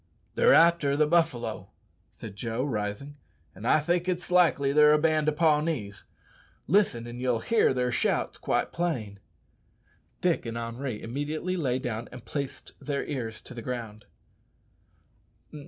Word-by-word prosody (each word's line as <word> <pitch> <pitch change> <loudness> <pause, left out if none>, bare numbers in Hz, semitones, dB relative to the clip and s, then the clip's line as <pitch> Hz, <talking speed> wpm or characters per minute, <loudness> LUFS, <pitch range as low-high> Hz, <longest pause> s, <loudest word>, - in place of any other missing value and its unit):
"They're - - +5
arter 165 -5 +4
the 155 - +4
buffalo," 160 -6 0 0.4
said - - -10
Joe, 115 +3 -3
rising, 125 +3 -4 0.4
"an' 100 +4 -10
I 155 - +5
think 175 +4 0
it's 180 0 -3
likely 160 -6 +3
they're 150 0 +6
a - - +5
band 155 -1 +2
o' - - +1
Pawnees. 150 -9 0 0.6
Listen 160 - +2
an' 120 +1 -8
ye'll 125 -3 0
hear 230 - +3
their 125 -1 0
shouts - - 0
quite - - -1
plain." 125 -13 -2 1.0
Dick 175 -8 0
and 115 0 -4
Henri 115 0 -5
immediately 150 +9 -3
lay 135 -8 0
down 120 -3 -4
and 125 -2 -11
placed 140 -2 -5
their 140 -1 -2
ears 115 -6 -5
to - - -12
the 120 - -7
ground. 115 -3 -6
140 Hz, 145 wpm, -27 LUFS, 115-160 Hz, 1.0 s, they're